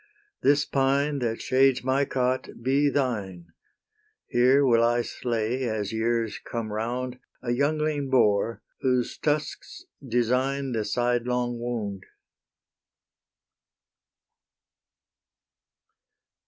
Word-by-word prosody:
This 145 0 +3
pine 140 +2 +1
that 115 -2 -2
shades 130 -1 +3
my 135 +2 +2
cot 130 -1 -1
be 140 +3 +3
thine; 100 -12 -2 0.7
Here 130 +4 +4
will 115 -3 +4
I 120 +1 +2
slay, 120 +2 -2
as 105 -1 -3
years 115 0 -1
come 115 -3 -5
round, 125 +3 -3 0.2
A 120 - -1
youngling 145 +2 0
boar, 115 -3 +2 0.2
whose 125 -2 0
tusks 150 - -2 0.2
design 130 +3 0
The 110 -3 -1
side 120 +2 0
long 120 -1 -1
wound. 105 -5 -4
125 Hz, 95 wpm, -26 LUFS, 115-135 Hz, 0.7 s, Here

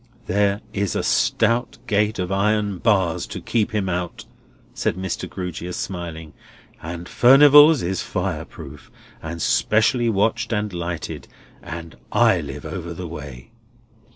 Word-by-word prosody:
"There 100 +1 +1
is 100 -2 -1
a - - -1
stout 115 +2 +1
gate 105 0 +1
of 90 0 -3
iron 105 -1 +1
bars 95 -7 +1
to - - -6
keep 115 -2 0
him 105 -4 -1
out," 90 -1 -3 0.5
said - - -1
Mr. 95 -1 -4
Grewgious, 90 -1 -5
smiling; 85 -4 -6 0.5
"and 85 +1 -7
Furnival's 145 +3 +7
is 90 +1 -1
fire - - -3
proof, 70 -2 -12 0.3
and 85 +1 -6
specially 115 - +2
watched 110 +3 0
and 105 -2 -1
lighted, 85 -1 -5 0.3
and 85 -1 -8
I - - +4
live - - -8
over 85 0 -6
the 90 +1 -6
way!" 75 - -9
95 Hz, 135 wpm, -22 LUFS, 85-110 Hz, 0.5 s, Furnival's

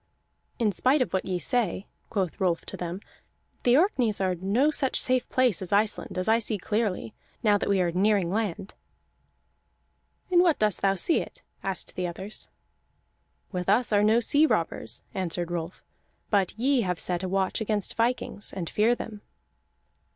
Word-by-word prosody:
"In 225 -4 +2
spite 255 - +3
of - - -9
what 190 - 0
ye 185 -1 -1
say," 200 +1 -1 0.2
quoth 190 -7 -2
Rolf 175 -3 +1
to - - -6
them, 175 +2 -5 0.6
"the 245 +1 +4
Orkneys 260 - +2
are 190 -1 +1
no 200 - +1
such 270 -3 +1
safe 255 -1 +1
place 250 -8 +2
as 185 - -6
Iceland, 210 -1 +1
as 185 - -2
I 225 +1 +4
see 215 -1 0
clearly, 200 - -2 0.3
now 210 -2 +5
that - - -2
we 200 -1 +3
are 175 -1 +1
nearing 190 -1 +2
land." 200 -2 -2 1.6
"In 350 - +5
what 340 -4 +3
dost 210 -3 +1
thou 195 0 +3
see 260 - +2
it?" - - -10 0.2
asked 195 -1 -3
the 180 -1 -1
others. 190 +4 -5 1.0
"With 180 -1 -3
us 220 +2 +3
are 205 - +5
no 220 +3 +4
sea 290 +6 +4
robbers," 125 - -2
answered 175 -2 -3
Rolf, 170 0 -5 0.5
"but 200 -1 +1
ye 260 +2 +2
have 180 -4 -2
set 180 -1 -1
a 185 - -3
watch 190 +2 0
against 210 -2 -1
vikings, 230 -3 -1
and 180 -4 -5
fear 225 +3 +3
them." 215 -3 -8
205 Hz, 170 wpm, -27 LUFS, 185-230 Hz, 1.6 s, now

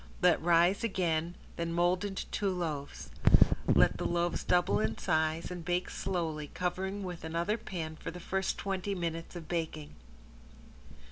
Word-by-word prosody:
Let - - +5
rise 175 +4 +4
again, 175 -5 0 0.2
then 170 0 -2
mold 175 +2 +2
into 195 -2 -3
two 200 - 0
loaves. 160 -6 -4 0.6
Let - - +5
the - - -3
loaves 175 0 0
double 175 +1 +3
in 110 +1 0
size 160 +2 0
and 175 -2 -5
bake 175 +1 -1
slowly, 160 -5 -2
covering 190 +4 -3
with 180 -2 -6
another 170 +6 0
pan 165 -8 -5
for - - -6
the 175 +2 -7
first 190 +2 -1
twenty 195 0 -2
minutes 165 -1 -4
of 165 -3 -7
baking. 160 -3 -3
175 Hz, 150 wpm, -31 LUFS, 160-185 Hz, 0.6 s, Let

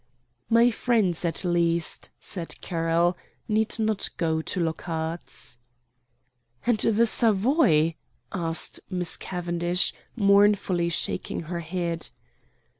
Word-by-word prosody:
"My 235 +1 +5
friends, 215 -8 +1
at 170 +2 -1
least," 170 -1 0
said 175 -4 -5
Carroll, 170 +1 +1 0.3
"need 220 0 +1
not 220 -2 0
go 160 -1 0
to 180 - -3
Lockhart's." 160 -5 -4 1.1
"And 240 -3 +2
the 225 +2 +3
Savoy?" 215 - +3 0.4
asked 165 -3 -1
Miss 180 -3 -1
Cavendish, 175 0 0 0.2
mournfully 200 -4 +3
shaking 165 - -1
her 170 +1 -5
head. 170 0 -3
175 Hz, 100 wpm, -26 LUFS, 165-205 Hz, 1.1 s, My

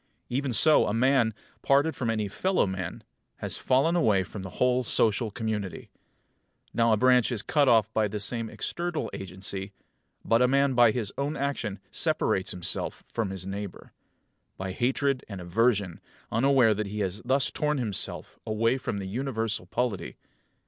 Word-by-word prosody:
Even 135 +2 -1
so 155 +6 +5
a 105 - -1
man, 125 -1 +3 0.3
parted 140 +4 +3
from 120 -3 -2
any 110 -2 0
fellow 185 - +1
man, 95 -3 -5 0.3
has - - -4
fallen 140 +7 +2
away 105 - +3
from 95 +2 -8
the 95 - -6
whole 125 0 +3
social 110 0 +2
community. 105 -3 -4 0.8
Now 115 -1 +3
a 110 - +4
branch 125 +1 +4
is 115 -5 -1
cut 145 -2 +2
off 110 -1 +3
by 110 -1 +2
some 115 +2 -2
external 175 -2 -3
agency; 95 +1 -4 0.5
but 115 +1 +3
a 125 - +5
man 140 +1 +3
by 120 -2 +6
his 110 -3 -2
own 145 +2 -1
action 135 -8 -2
separates 95 - +1
himself 90 -2 -3
from 115 -4 -2
his 95 -1 -6
neighbour 100 0 -7 0.6
by 95 0 -4
hatred 130 +5 0
and 100 -3 -6
aversion, 100 0 +1 0.3
unaware 120 -1 +4
that 105 0 -3
he 105 +1 -4
has 100 +2 -2
thus 130 +2 +1
torn 150 0 0
himself 110 -7 -3
away 115 +4 +1
from 115 -5 -3
the 100 - -4
universal 110 -3 -3
polity. 115 -1 -2
115 Hz, 160 wpm, -27 LUFS, 100-130 Hz, 0.8 s, by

